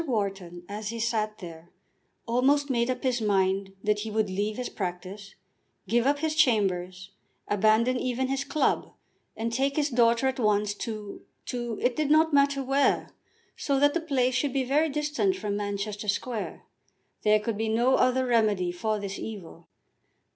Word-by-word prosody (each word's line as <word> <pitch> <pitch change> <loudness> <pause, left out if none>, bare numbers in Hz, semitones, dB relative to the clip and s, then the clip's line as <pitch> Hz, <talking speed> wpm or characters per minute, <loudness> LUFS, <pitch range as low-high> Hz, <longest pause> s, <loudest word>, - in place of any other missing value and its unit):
Wharton, 195 -7 -3
as 210 +1 -5
he 230 0 -5
sat 215 -2 -1
there, 170 -2 -10 0.6
almost 270 +4 +2
made 235 -1 +1
up 255 -1 -2
his 250 -3 0
mind 195 -1 +1
that 210 0 +1
he 220 +1 -4
would 215 -2 0
leave 205 +3 -2
his 250 -1 -3
practice, 190 +1 -6 0.5
give 235 +2 +2
up 285 +1 +3
his 310 +1 -1
chambers, 190 - +1 0.4
abandon 220 +5 +3
even 255 +1 -1
his 270 +1 -1
club, 285 +2 0 0.4
and 230 +1 -2
take 275 +3 0
his 290 -1 0
daughter 235 +1 +3
at 265 0 0
once 210 -2 +2
to 215 -1 -6 0.2
to; 240 -3 -4
it 245 -1 +2
did 305 -2 0
not 315 +1 +4
matter 280 -1 +3
where, 270 +1 +1 0.4
so 280 -2 0
that 290 +1 +4
the 340 - 0
place 260 -5 +1
should 255 +1 0
be 270 -1 +1
very 295 +5 +2
distant 300 +6 0
from 210 - -3
Manchester 205 +1 -4
Square. 220 +2 -3 0.6
There 215 0 +4
could 215 +1 -3
be 220 0 0
no 240 +4 +2
other 255 0 +3
remedy 215 -7 +2
for 215 +5 -2
this 200 -1 -5
evil. 180 -6 -8
230 Hz, 170 wpm, -27 LUFS, 205-265 Hz, 0.6 s, not